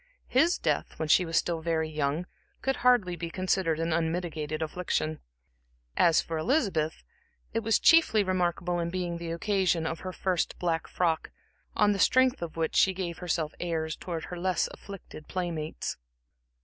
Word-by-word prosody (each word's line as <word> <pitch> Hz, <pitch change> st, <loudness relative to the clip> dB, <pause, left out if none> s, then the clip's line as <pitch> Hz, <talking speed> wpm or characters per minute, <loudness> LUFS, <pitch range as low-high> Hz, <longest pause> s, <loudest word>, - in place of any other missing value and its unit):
His 320 Hz, +8 st, +3 dB
death, -, -, -1 dB
when 155 Hz, -, -3 dB
she 180 Hz, -, +5 dB
was 165 Hz, -1 st, 0 dB
still 170 Hz, -2 st, 0 dB
very 160 Hz, -1 st, 0 dB
young, 155 Hz, +2 st, -1 dB, 0.4 s
could 270 Hz, -1 st, 0 dB
hardly 240 Hz, -8 st, +3 dB
be 170 Hz, 0 st, -5 dB
considered 185 Hz, -2 st, 0 dB
an 165 Hz, 0 st, 0 dB
unmitigated 160 Hz, -2 st, -2 dB
affliction. 155 Hz, -1 st, -2 dB, 0.8 s
As 165 Hz, -2 st, +5 dB
for 165 Hz, -1 st, -4 dB
Elizabeth, 175 Hz, -, 0 dB, 0.5 s
it 225 Hz, -, +1 dB
was 225 Hz, 0 st, +2 dB
chiefly 325 Hz, -11 st, +5 dB
remarkable 175 Hz, -1 st, 0 dB
in 170 Hz, 0 st, -1 dB
being 175 Hz, -1 st, -3 dB
the 170 Hz, -1 st, -5 dB
occasion 180 Hz, -1 st, +1 dB
of 165 Hz, 0 st, -3 dB
her 185 Hz, -, -5 dB
first 185 Hz, -2 st, -1 dB
black 165 Hz, -2 st, -1 dB
frock, 165 Hz, -3 st, 0 dB, 0.5 s
on 210 Hz, 0 st, +4 dB
the 200 Hz, -, -1 dB
strength 260 Hz, +2 st, +4 dB
of 165 Hz, -1 st, -5 dB
which 160 Hz, -1 st, -1 dB
she 190 Hz, -, +5 dB
gave 175 Hz, -2 st, -4 dB
herself 165 Hz, -3 st, -1 dB
airs 160 Hz, -2 st, -2 dB
towards 170 Hz, -3 st, -5 dB
her 180 Hz, -, -7 dB
less 185 Hz, 0 st, +1 dB
afflicted 195 Hz, -6 st, -10 dB
playmates. 170 Hz, -4 st, -3 dB
175 Hz, 160 wpm, -28 LUFS, 160-185 Hz, 0.8 s, she